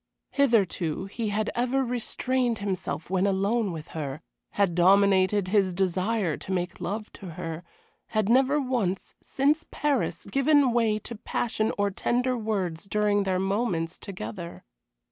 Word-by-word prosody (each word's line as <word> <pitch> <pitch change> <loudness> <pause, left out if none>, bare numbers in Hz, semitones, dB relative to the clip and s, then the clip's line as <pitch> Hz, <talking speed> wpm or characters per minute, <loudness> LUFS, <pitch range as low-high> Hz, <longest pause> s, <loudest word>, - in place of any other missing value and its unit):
Hitherto 195 - +1
he 215 +2 -3
had 210 +1 -1
ever 255 +2 +1
restrained 245 0 0
himself 185 -5 -4
when 190 +1 +2
alone 200 +2 +1
with 160 -2 -7
her, 150 -1 -5 0.3
had 200 -4 +2
dominated 190 +1 +4
his 190 -3 +2
desire 190 -1 0
to - - -7
make 180 -1 -2
love 210 +3 -4
to 195 - -10
her; 165 +1 -5 0.4
had 215 -2 0
never 265 +5 +4
once, 240 -9 -1
since 290 +4 +1
Paris, 290 -3 -1
given 275 -1 +3
way 230 -3 +2
to 235 +2 -7
passion 220 0 -1
or 205 0 +1
tender 250 +6 0
words 200 -7 -2
during 205 0 +1
their 190 -1 +1
moments 190 -4 -1
together. 170 - -7
205 Hz, 140 wpm, -27 LUFS, 185-235 Hz, 0.4 s, dominated